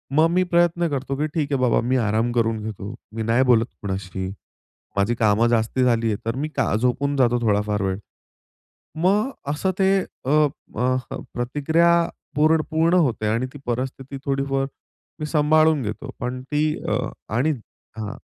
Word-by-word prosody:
मग 155 +2 +6
मी 180 +1 +3
प्रयत्न 170 0 +3
करतो 140 -1 -2
की 150 +2 0
ठीक 150 -3 -1
आहे 135 - +1
बाबा, 125 - +3
मी 125 +3 +1
आराम 110 0 +1
करून 115 -2 +1
घेतो, 105 0 -6 0.2
मी 115 - -2
नाही 115 +4 +3
बोलत 120 -3 +4 0.2
कोणाशी. 95 -1 -4 0.7
माझी 100 +4 +2
कामं 110 0 +3
जास्ती 120 +2 +1
झालीय 115 -3 +2
तर 115 +2 -1
मी 150 +3 -2
का - - +1
झोपून 130 +5 0
जातो 120 -2 +3
थोडाफार 105 -1 +1
वेळ. 95 -1 -1 1.0
मग 195 +9 +2 0.2
असं 150 +6 0
ते 190 0 +4 0.4
अ, - - -1 0.5
अ, 125 +2 +2 0.4
प्रतिक्रिया 160 +7 +2 0.4
पूर्ण 155 +2 +4
पूर्ण 165 +2 +3
होते 125 -11 +2
आणि 115 +4 +1
ती 145 - -9
परिस्थिती 130 +3 -3
थोडीफार 135 0 0 0.5
मी 155 - -2
सांभाळून 155 0 +3
घेतो. 110 +5 -5
पण 125 0 -3
ती 150 0 +2 0.3
अ, - - +1 0.3
आणि 130 +8 +2 0.5
हां. 110 -1 -4
130 Hz, 160 wpm, -23 LUFS, 115-150 Hz, 1.0 s, मग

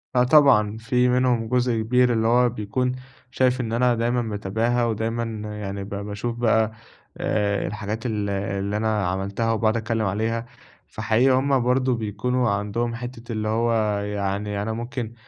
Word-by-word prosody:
آه 125 - +5
طبعًا، 125 -7 +5
في 125 +1 +2
منهم 125 -2 +2
جزء 120 -2 +1
كبير 125 +2 +3
اللي 110 -1 +1
هو 120 +1 +4
بيكون 120 +3 -2 0.4
شايف 130 0 +2
إن 115 -1 -3
أنا 120 +1 +3
دايماً 120 +2 0
متابعها 110 +2 -1
ودايماً 115 +1 -1 0.4
يعني 100 -1 -4
ب 100 - -9
باشوف 105 +3 -4
بقى 110 -2 +2 0.5
آآ، 100 -1 0
الحاجات 105 +3 -5
ال 105 -3 -1
اللي 100 +1 -2
أنا 110 -3 0
عملتها 100 +5 -1
وباقعد 110 0 +1
أتكلم 115 -1 -1
عليها، 110 +4 -1 0.4
فحقيقي 110 +5 +2
هُم 135 +1 +3
برضه 125 +1 +2
بيكونوا 115 +3 -1
عندهم 105 +4 -1
حتّة 120 0 -7
اللي 110 -1 -2
هو 115 +2 +1 0.3
يعني 100 0 -2
أنا 110 +2 -2
ممكن 120 0 -5
115 Hz, 155 wpm, -23 LUFS, 105-120 Hz, 0.5 s, آه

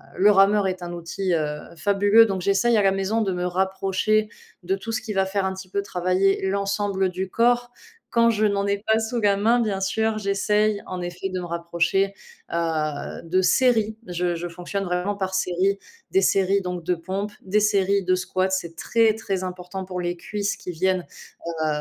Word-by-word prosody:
le 200 +3 +5
rameur 200 0 +4
est 185 -1 -5
un 175 0 -6
outil, 175 +2 -3
heu, 150 -2 -1 0.2
fabuleux. 205 +5 +5
Donc 195 -3 -2
j'essaye 200 +5 +2
à - - +4
la 195 -1 +4
maison 195 +4 0
de 195 -3 0
me 180 0 -2
rapprocher 190 +3 0 0.3
de 190 +2 0
tout 210 +4 -6
ce 225 +2 -2
qui 225 -4 -5
va 195 -1 +2
faire 195 +1 -1
un 190 - -1
petit 190 0 -10
peu 200 +2 -1
travailler 190 0 +1
l'ensemble 200 -1 0
du 185 +1 -4
corps. 245 +3 +2 0.4
Quand 235 0 +4
je 215 -1 +2
n'en 200 -1 +1
ai 200 0 +1
pas 220 0 +3
sous 225 +2 -2
la 200 -1 +3
main, 230 +4 +3
bien 205 -4 -1
sûr, 220 +3 0
j'essaye, 210 +1 +1
en 185 -1 -5
effet, 175 +2 -4
de 185 -1 -3
me 180 - -5
rapprocher, 170 +3 0 0.4
heu, 155 -3 -2
de 180 +3 +1
séries. 220 0 +3
Je 175 0 -1
je 170 +1 -4
fonctionne 180 +4 -4
vraiment 180 +2 -1
par 190 -1 -3
séries, 190 +1 +1 0.3
des 385 - +4
séries 195 - +2
donc 180 -2 -4
de 180 +2 +1
pompes, 190 +5 -4
des 205 +3 +1
séries 200 -1 +2
de 185 0 +2
squats. 185 0 -1
C'est 170 -3 -2
très, 225 +4 +2
très 195 -4 -3
important 185 +1 -6
pour 180 -1 -5
les 175 0 -2
cuisses 205 +4 -3
qui 180 - -6
viennent, 185 +1 0 0.6
heu, - - +1
195 Hz, 200 wpm, -24 LUFS, 180-205 Hz, 0.6 s, le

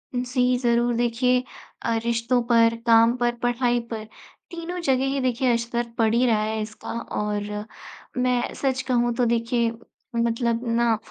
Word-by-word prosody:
जी, 250 0 +1
ज़रूर 240 -1 +2
देखिए 250 +2 +1 0.4
अ, 230 - 0
रिश्तों 235 +1 +1
पर, 230 -1 +5
काम 230 +1 +6
पर, 240 0 +1
पढ़ाई 245 0 +1
पर, 220 -1 -4 0.5
तीनों 345 +1 -5
जगह 265 -3 +1
ही 280 - -1
देखिए 255 0 +1
असर 235 0 -2
पड़ 225 -1 +2
ही 240 +2 +3
रहा 220 -3 +2
है 220 0 -2
इसका 215 +1 -7 0.3
और 210 0 -2 0.7
मैं 250 -1 +1
सच 260 -2 -1
कहूँ 240 -1 +2
तो 245 - +2
देखिए 230 0 +1 0.4
मतलब 235 0 0
ना 235 -2 +3
240 Hz, 150 wpm, -24 LUFS, 230-250 Hz, 0.7 s, काम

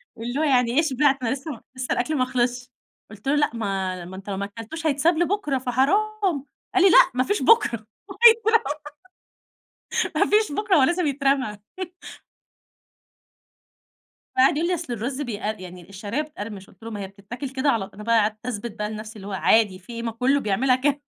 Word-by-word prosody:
واللي 245 +5 -4
هو - - +2
يعني 250 -5 +3
إيه - - +7
شبعت؟ 280 -2 +2
أنا 230 - 0
لسه 275 +3 -6
م 240 - -9
لسه 255 0 -4
الأكْل 300 +5 0
ما 255 - +2
خلصش، 245 0 -1 0.4
قُلت 215 +3 -11
له: 280 - +3
"لأ 295 0 +3
ما 190 -5 -3
ما 185 +2 -9
أنت 195 +2 -9
ما 200 0 -2
أكلتوش 225 +11 -6
هيتساب 315 +3 +2
لبُكرة 345 -4 0
فحرام"، 315 - 0 0.3
قال 375 - +5
لي: 390 - +7
"لأ، - - +7
ما 255 +1 +2
فيش 410 +8 -1
بُكرة 235 - +4 0.2
وهيترمى، 450 +2 +5 1.5
ما - - +2
فيش 425 -5 +3
بُكرة 415 +4 +2
هو 290 - +5
لازم 345 +5 +2
يترمى". 275 -6 0 2.8
فقعد 265 +3 +5
يقول 335 +3 0
لي: - - +1
"أصل 335 -7 -3
الرز 255 +5 -3
بيقر 215 -4 -3
يعني 180 -1 -11
الشعرية 205 +7 -3
بتقرمش"، 210 -10 -8
قُلت 190 - -21
له: 230 - -7
"ما 210 - -5
هي 195 - -5
بتتاكل 205 +8 -8
كده 265 +2 0
على" 215 -7 0
أنا 210 - -10
بقى 230 +1 +3
قعدت 215 +2 -1
اثبت 235 -1 -4
بقى 210 0 -2
لنَفسي 215 0 -7
اللي 200 -2 -9
هو - - -6
عادي 195 0 +3
في 195 +6 -12
إيه، 230 0 -5
ما 230 - -2
كلّه 255 +5 +2
بيعملها 250 +3 +2
ك 285 +2 0
250 Hz, 190 wpm, -24 LUFS, 215-295 Hz, 2.8 s, إيه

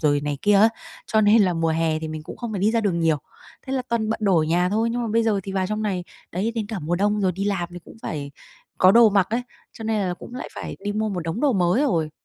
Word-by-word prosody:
rồi 145 -2 +2
này 145 -1 -3
kia 205 0 +4
á, 215 +3 +7 0.4
cho 220 - +2
nên 210 +1 +5
là 185 - +2
mùa 165 0 0
hè 160 -1 +1
thì 160 - -5
mình 155 0 -6
cũng - - -9
không 235 -2 -5
phải 195 - -3
đi 210 - +3
ra 230 0 +1
đường 185 -5 0
nhiều, 160 -2 +3 0.5
thế 265 - -4
là 260 - 0
toàn 225 -2 0
bận 225 - -2
đồ 195 -4 +3
ở 155 - +3
nhà 175 +3 +2
thôi. 220 +3 +1
Nhưng 240 +1 -2
mà 230 - -2
bây 230 0 +3
giờ 210 -3 +1
thì 195 - -6
vào 190 -1 0
trong 215 +1 -2
này, 185 -4 -2 0.3
đấy 200 +6 -1
đến 220 -3 -2
cả 215 -2 -4
mùa 165 +2 -2
đông 205 +2 +1
rồi 190 -2 +2
đi 195 +3 -3
làm 190 -4 -1
thì 175 - -7
cũng - - -14
phải 145 -7 -4 0.5
có 185 - +7
đồ 235 -1 +7
mặc 195 -2 +3
ấy, 240 +2 0 0.3
cho 225 - -9
nên 220 -1 0
là 180 - -2
cũng 240 - -11
lại 255 - -6
phải - - -6
đi 205 - -1
mua 215 +1 -1
một 190 -4 -3
đống 165 +6 -3
đồ 290 -3 +3
mới 185 +5 +2
rồi. 165 - +1
195 Hz, 305 wpm, -23 LUFS, 170-220 Hz, 0.5 s, á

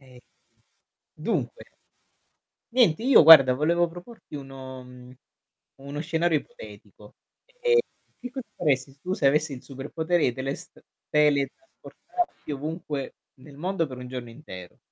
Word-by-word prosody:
Eh, 130 -2 -17 0.9
dunque, 485 - -3 1.1
niente 230 -8 +3
io 260 -4 +7
guarda 140 -5 +10
volevo 170 +5 +2
proporti 175 +2 -13
uno 135 -2 -9
uhm, 125 0 -14 0.6
uno 140 +2 -7
scenario 165 0 +1
ipotetico. 485 0 -14 0.5
Ehm, 475 -1 +4 0.4
che 250 - -7
cosa 255 0 -7
faresti 135 -3 0
tu 185 +4 -2
se 140 - 0
avessi 150 +2 +2
il 125 - -11
superpotere 160 +5 -1
i 125 - +1
telest 135 +2 -6 0.3
teletrasportati 150 - -1
ovunque 150 -1 -5 0.3
nel 140 +1 -14
mondo 175 +2 -1
per 130 -3 -9
1 125 0 -8
giorno 125 -2 -6
intero? 95 -9 -11
150 Hz, 125 wpm, -26 LUFS, 135-175 Hz, 1.1 s, guarda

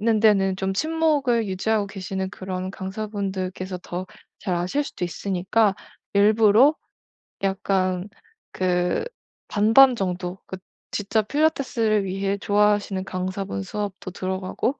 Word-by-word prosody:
...는 220 0 +2
데는 195 -3 +4
좀 190 0 -2
친목을 290 -6 +1
유지하고 200 +2 0
계시는 190 -1 -4
그런 185 -1 -5
강사분들께서 190 -2 -4
더 180 +1 -5 0.3
잘 185 - -1
아실 185 +12 0
수도 185 - -4
있으니까 195 +4 +1 0.4
일부러 215 +6 +5 0.7
약간 190 -1 0 0.5
그 180 -1 +1 0.5
반반 225 +5 +6
정도 180 -1 -3
그 - - -5 0.4
진짜 215 +2 0
필라테스를 230 -5 +1
위해 195 +1 -1
좋아하시는 205 -1 +2
강사분 185 - -3
수업도 200 - -5
들어가고 190 +8 -2
195 Hz, 270 characters per minute, -24 LUFS, 185-215 Hz, 0.7 s, 반반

